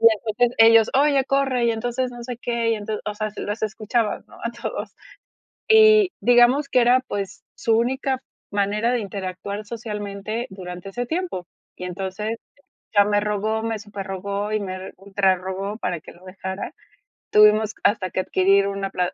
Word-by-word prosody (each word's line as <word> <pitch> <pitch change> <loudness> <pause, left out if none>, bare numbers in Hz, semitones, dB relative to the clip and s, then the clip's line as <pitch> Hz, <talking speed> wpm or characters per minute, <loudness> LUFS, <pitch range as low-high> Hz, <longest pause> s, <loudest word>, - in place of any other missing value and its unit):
Y 210 - -14
entonces 245 +3 +1
ellos: 225 -1 +7
"Oye, 275 -1 +4
corre, 270 -3 +1
y - - +3
entonces 245 +3 -2
no 240 -1 -9
sé 245 -1 -5
qué, 235 -2 -1
y 225 - +3
entonces". 210 0 -4
O 210 - -2
sea, 215 0 -2
así 210 - -9
los 210 +2 -4
escuchabas, 215 +1 -1
¿no? - - -16
A 235 - -1
todos. 215 -3 -5 0.7
Y 435 -3 +7
digamos 245 +4 +5
que 250 - +3
era, 245 +2 +5
pues, 200 -1 -4
su 225 -1 +2
única 260 +2 0 0.3
manera 205 +4 +1
de 245 - +1
interactuar 200 +1 -5
socialmente 215 0 -5
durante 180 0 -8
ese 245 +5 -3
tiempo. 330 - -3 0.3
Y - - -7
entonces 195 +5 -4 0.6
ya 205 0 +6
me 205 0 +2
rogó, 210 +1 -1
me 225 -1 -2
superrogó, 200 0 -4
y 215 - +1
me 185 -1 -6
ultrarrogó 195 +1 -1
para 180 -7 -3
que - - -12
lo 175 +2 -18
dejara. 190 +1 -6 0.6
Tuvimos 210 +1 +5
hasta 195 -4 +2
que - - -2
adquirir 195 +2 +3
una 195 0 -3
pla 180 -2 -1
210 Hz, 170 wpm, -23 LUFS, 195-240 Hz, 0.7 s, ellos